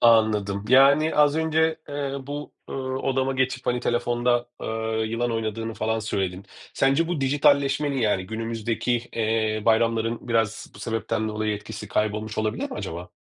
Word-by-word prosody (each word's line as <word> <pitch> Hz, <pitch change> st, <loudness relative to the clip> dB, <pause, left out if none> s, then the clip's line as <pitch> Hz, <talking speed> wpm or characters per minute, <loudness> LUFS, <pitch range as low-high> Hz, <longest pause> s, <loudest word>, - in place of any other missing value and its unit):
Anladım. 105 Hz, -3 st, +3 dB
Yani 140 Hz, +4 st, +6 dB
az 150 Hz, 0 st, +4 dB
önce, 160 Hz, 0 st, +2 dB
eee, 140 Hz, -1 st, -3 dB
bu, 145 Hz, +1 st, -6 dB, 0.2 s
ııı, 130 Hz, -1 st, -3 dB
odama 135 Hz, 0 st, 0 dB
geçip, 130 Hz, -1 st, -1 dB
hani, 125 Hz, 0 st, +1 dB
telefonda, 120 Hz, 0 st, +1 dB
eee, -, -, -4 dB, 0.4 s
yılan 115 Hz, +2 st, -1 dB
oynadığını 115 Hz, 0 st, -3 dB
falan 110 Hz, +1 st, -1 dB
söyledin. 95 Hz, -3 st, -2 dB, 0.3 s
Sence 135 Hz, +5 st, +2 dB
bu 175 Hz, -5 st, -1 dB
dijitalleşmenin, 140 Hz, +1 st, +2 dB
yani 105 Hz, -5 st, +1 dB
günümüzdeki, 115 Hz, +2 st, -1 dB
eee, 110 Hz, -1 st, 0 dB
bayramların 115 Hz, +1 st, +1 dB
biraz 115 Hz, -1 st, 0 dB
bu -, -, -13 dB
sebepten 110 Hz, -1 st, -2 dB
dolayı 110 Hz, 0 st, -1 dB
etkisi 105 Hz, 0 st, -8 dB
kaybolmuş 110 Hz, +1 st, -1 dB
olabilir 110 Hz, 0 st, -1 dB
mi -, -, -5 dB
acaba? 85 Hz, +2 st, -5 dB
115 Hz, 145 wpm, -25 LUFS, 110-135 Hz, 0.4 s, Yani